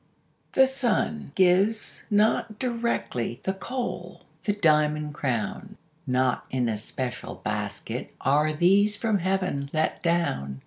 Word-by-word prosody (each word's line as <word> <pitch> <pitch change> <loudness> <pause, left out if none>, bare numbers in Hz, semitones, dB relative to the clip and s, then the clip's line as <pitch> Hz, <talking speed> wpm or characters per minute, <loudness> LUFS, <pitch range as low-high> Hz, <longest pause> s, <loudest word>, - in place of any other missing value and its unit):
The 265 - +6
sun 235 - -1
gives 190 +4 +2
not 215 0 +2
directly 235 - -2
The 190 - 0
coal, 245 +6 -5 0.2
the 205 - +2
diamond 150 -5 +2
crown; 140 - -3 0.3
Not 125 0 +1
in 125 -2 0
a 110 - 0
special 125 +4 -5
basket 105 +3 -4
Are 150 +3 +3
these 195 +6 +3
from 215 -2 +1
Heaven 185 -6 -1
let 155 0 0
down. 70 - 0
165 Hz, 120 wpm, -26 LUFS, 125-205 Hz, 0.3 s, The